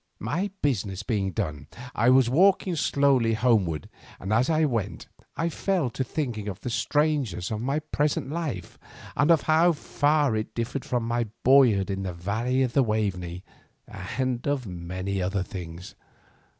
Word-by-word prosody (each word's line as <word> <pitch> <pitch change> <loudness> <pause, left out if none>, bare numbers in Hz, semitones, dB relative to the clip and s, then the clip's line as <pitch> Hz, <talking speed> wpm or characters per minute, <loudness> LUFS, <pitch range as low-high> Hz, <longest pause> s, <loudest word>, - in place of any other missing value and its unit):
My 185 +6 -2
business 105 -8 -1
being 100 -3 -1
done 75 -4 -4 0.3
I 115 +3 +3
was 130 -1 +5
walking 185 +6 +3
slowly 135 -7 +2
homeward, 105 - +1 0.3
and 95 +3 -3
as 120 +6 +3
I 160 -1 +3
went 115 -8 -2 0.3
I 165 - 0
fell 170 -5 -1
to 130 - -2
thinking 120 -6 -3
of 100 -1 -5
the 125 - -4
strangeness 130 - 0
of 110 0 -2
my 135 +4 0
present 145 -2 -1
life 150 - -4 0.4
and 150 +2 +2
of 165 -4 +5
how 165 +2 +4
far 145 -3 +1
it 110 0 -4
differed 120 +3 -3
from 120 -2 -1
my 120 0 0 0.2
boyhood 120 -8 +5
in 95 0 -3
the 95 -2 -4
valley 110 +9 0
of 125 -3 -1
the 140 - +4
Waveney, 95 -6 -2 0.4
and 130 -1 -3
of 140 -3 0
many 95 +1 -4
other 95 +1 -1
things. 90 -2 -8
120 Hz, 160 wpm, -26 LUFS, 95-145 Hz, 0.4 s, was